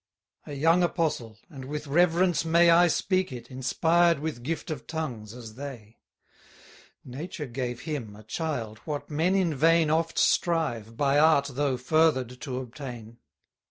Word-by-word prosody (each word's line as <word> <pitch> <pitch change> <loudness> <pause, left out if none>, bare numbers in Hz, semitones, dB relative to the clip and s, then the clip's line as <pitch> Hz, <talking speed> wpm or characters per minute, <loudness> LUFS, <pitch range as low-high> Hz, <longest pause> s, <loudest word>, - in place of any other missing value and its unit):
A 145 - -6
young 165 +5 +3
apostle; 155 -11 -1
and, 135 -3 -10
with 150 +2 -5
reverence 175 +3 +2
may 170 +1 +5
I 175 +1 +6
speak 185 0 0
it, 120 0 -9
inspired 165 +6 +2
with 150 -4 -5
gift 160 +5 -4
of 150 - -6
tongues, 125 -10 -5
as 115 -2 -10
they. 120 -4 -9 1.1
Nature 150 +4 -6
gave 125 -1 -4
him, 130 -10 -5
a 105 - -13
child, 115 -4 -4
what 150 -1 -5
men 165 +6 +1
in 180 -5 +1
vain 160 +2 +3
Oft 165 +1 0
strive, 120 -10 +1
by 140 +1 +3
art 150 -3 +4
though 135 -1 0
further'd, 130 -3 +1
to 130 -4 -4
obtain. 120 -3 -9
145 Hz, 150 wpm, -27 LUFS, 125-165 Hz, 1.1 s, I